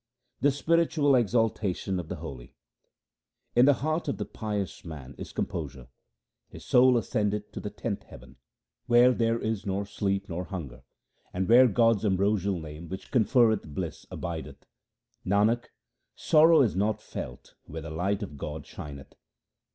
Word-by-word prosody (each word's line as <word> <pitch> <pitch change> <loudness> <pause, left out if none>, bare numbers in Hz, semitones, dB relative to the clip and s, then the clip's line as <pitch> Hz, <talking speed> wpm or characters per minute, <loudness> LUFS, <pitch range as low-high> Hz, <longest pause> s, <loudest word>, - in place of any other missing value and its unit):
The 145 - +4
spiritual 155 0 +2
exaltation 110 -5 0
of 85 - -6
the - - -4
holy: 65 -3 -9 0.5
— - - -53
In 120 +1 +6
the 145 - +6
heart 155 +1 -1
of 140 - -1
the - - -3
pious 105 -3 -4
man 75 -6 -9
is - - -7
composure; 65 -1 -5 0.6
his - - -12
soul 125 0 +5
ascendeth 105 -2 -1
to - - -6
the 105 - -5
tenth 105 0 -4
heaven, 65 +1 -14 0.5
Where 120 +1 +6
there 115 -1 +1
is 110 -2 -2
nor 100 0 -2
sleep 100 -1 -2
nor 90 0 -4
hunger, 70 -11 -7 0.5
and 95 0 -1
where 125 +3 +7
God's 115 -1 +3
ambrosial 100 -1 +1
name 80 +1 -9
which 95 0 -8
conferreth 110 - +2
bliss 85 -3 -5
abideth. 80 -5 -6 0.6
Nanak, 105 +5 +2 0.5
sorrow 160 0 +5
is 110 - 0
not 105 +3 0
felt - - -8
where 80 0 -7
the 80 - -7
light 95 +6 -1
of 75 -8 -8
God 75 +2 -6
shineth. 70 -2 -10
100 Hz, 150 wpm, -28 LUFS, 85-115 Hz, 0.6 s, where